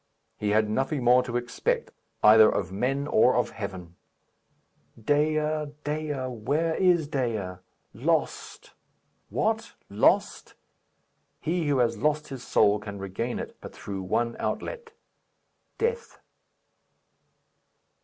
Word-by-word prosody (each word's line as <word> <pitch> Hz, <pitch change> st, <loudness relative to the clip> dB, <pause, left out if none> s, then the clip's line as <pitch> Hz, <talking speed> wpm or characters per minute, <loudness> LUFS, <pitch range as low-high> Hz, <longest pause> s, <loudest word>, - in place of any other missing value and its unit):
He 105 Hz, -, -1 dB
had 110 Hz, +1 st, +3 dB
nothing 135 Hz, +5 st, -1 dB
more 125 Hz, +1 st, +6 dB
to 120 Hz, -1 st, -3 dB
expect 120 Hz, -1 st, -2 dB, 0.3 s
either 110 Hz, 0 st, +8 dB
of 95 Hz, -2 st, -2 dB
men 130 Hz, +8 st, -1 dB
or 125 Hz, -2 st, +4 dB
of 125 Hz, -, +1 dB
heaven. 95 Hz, -5 st, -7 dB, 1.0 s
Dea! 150 Hz, +6 st, +2 dB, 0.5 s
Dea! 150 Hz, 0 st, -2 dB
Where 135 Hz, +7 st, -1 dB
is 175 Hz, -3 st, +3 dB
Dea? 115 Hz, -, -2 dB, 0.4 s
Lost! -, -, -2 dB, 0.6 s
What? -, -, -1 dB, 0.2 s
lost? -, -, +1 dB, 0.8 s
He 170 Hz, 0 st, -1 dB
who 145 Hz, -2 st, +2 dB
has 115 Hz, -3 st, +1 dB
lost 150 Hz, +3 st, 0 dB
his 135 Hz, -3 st, -7 dB
soul 105 Hz, -4 st, +3 dB
can 105 Hz, -1 st, -7 dB
regain 100 Hz, +5 st, -4 dB
it -, -, -6 dB
but -, -, -10 dB
through 100 Hz, -2 st, -6 dB
one 115 Hz, +6 st, -1 dB
outlet 475 Hz, -2 st, -4 dB, 0.9 s
death. 465 Hz, 0 st, -2 dB
125 Hz, 115 wpm, -27 LUFS, 105-150 Hz, 1.0 s, either